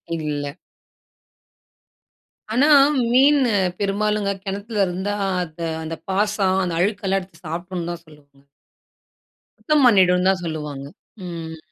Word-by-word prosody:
இல்ல. 145 -3 -3 2.0
ஆனா, 265 +6 +4 0.4
மீன் 280 +4 +5 0.4
பெரும்பாலுங்க 205 0 0
கிணத்துல 200 +1 -2
இருந்தா, 190 +3 -3 0.3
அது 165 0 -7 0.2
அந்த 165 +1 -5
பாசன், 195 -1 +1
அந்த 175 -2 -2
அழுக்கு 200 +2 0
எல்லாம் 195 +1 +2
எடுத்து 180 -2 -16
சாப்பிடணும்னு 175 +1 -5
தான் 170 -1 -8
சொல்லுவாங்க. 140 -2 -21 1.1
சுத்தம் 300 -3 +2
பண்ணிடுன்னு 185 -5 +4
தான் 190 -1 +1
சொல்லுவாங்க. 150 -4 -5 0.4
ம். 165 -2 -7
185 Hz, 110 wpm, -21 LUFS, 160-205 Hz, 2.0 s, மீன்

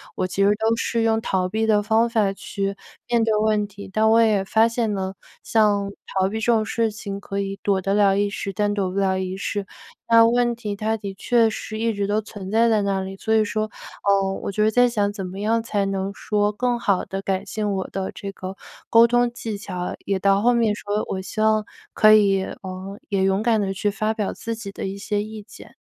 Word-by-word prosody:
我 - - -1
其 185 +2 -2
实 200 - +5
都 220 +1 +2
是 230 0 -1
用 225 -1 +2
逃 185 -4 -1
避 220 +3 0
的 210 -2 +3
方 225 +2 +2
法 215 -4 +2
去 195 0 -4 0.3
面 235 -1 +3
对 225 -1 +2
问 210 -1 +2
题， 200 0 -11
但 215 +2 +2
我 225 +1 +5
也 215 -4 +3
发 220 +3 +4
现 230 -2 -1
呢， 190 -1 -3 0.3
像 205 -3 +2 0.2
逃 190 0 0
避 220 +2 -3
这 235 +2 +2
种 220 -1 +2
事 225 0 0
情 200 -1 -6
可 200 0 -5
以 195 0 -4
躲 195 -2 +1
得 195 +1 0
了 200 -2 +4
一 205 0 +1
时， 200 0 -4
但 205 +2 0
躲 195 -3 -1
不 190 - -5
了 190 -1 +1
一 185 0 -3
世。 200 0 -3 0.4
那 230 0 +7
问 240 0 +2
题 210 -3 -4
它 220 +2 -1
的 200 -2 -7
确 230 +2 +3
是 215 0 -6
一 230 0 +1
直 200 -2 -2
都 205 +2 0
存 200 -2 -9
在 230 +2 +4
在 215 -2 +2
那 195 -1 0
里， 190 0 -6
所 220 +2 -1
以 220 -1 +4
说， 215 +1 -1 0.4
呃， 195 -1 +3
我 - - -2
觉 210 +2 +1
得 215 - +4
在 245 +2 +4
想 205 -4 0
怎 200 -2 -6
么 185 +2 -7
样 225 +2 +1
才 205 -3 -1
能 195 0 -2
说 205 0 0
更 240 +3 -1
好 200 -5 +1
地 195 0 -5
改 190 -1 -1
进 210 0 -3
我 190 -1 -2
的 190 -1 -4
这 200 0 -6
个 190 0 -7 0.4
沟 230 0 +7
通 240 0 +2
技 225 -3 -5
巧， 180 -3 -5
也 195 -1 0
到 195 +1 +3
后 245 +1 +4
面 230 -3 +2
说 205 0 -2
我 190 - -2
希 215 +3 -4
望 215 -1 +3 0.3
可 215 0 +6
以， 200 -3 +4
呃， 190 +2 -7
也 195 -2 +1
勇 195 +1 +2
敢 225 -1 +2
地 195 -2 -1
去 205 +2 0
发 215 +2 -1
表 215 -3 -2
自 230 0 -5
己 220 -3 -7
的 - - -6
一 195 0 -4
些 205 0 -1
意 215 0 -8
见。 205 - -14
205 Hz, 255 characters per minute, -23 LUFS, 195-220 Hz, 0.4 s, 那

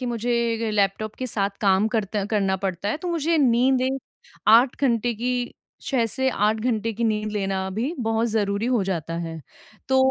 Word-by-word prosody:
कि 255 - -3
मुझे 230 -1 0
लैपटॉप 205 +1 0
के 255 - -2
साथ 200 -4 -1
काम 200 +1 +3
करता 205 -2 -1
करना 195 -2 +1
पड़ता 190 +1 -2
है 210 - 0
तो - - -1
मुझे 330 -1 +1
नींद 255 -1 +3
एक 270 +1 -2 0.5
8 240 +4 +6
घंटे 240 -2 +2
की, 245 +3 -1 0.5
6 255 -4 +1
से 265 +4 -1
8 215 0 +1
घंटे 225 -1 0
की 235 - +1
नींद 215 -1 0
लेना 195 -2 -1
भी 265 +8 -1
बहुत 225 0 +1
ज़रूरी 210 0 0
हो 220 - +2
जाता 165 -3 -3
है। 165 -1 -6 0.5
तो 265 0 +4
225 Hz, 185 wpm, -24 LUFS, 200-245 Hz, 0.5 s, 8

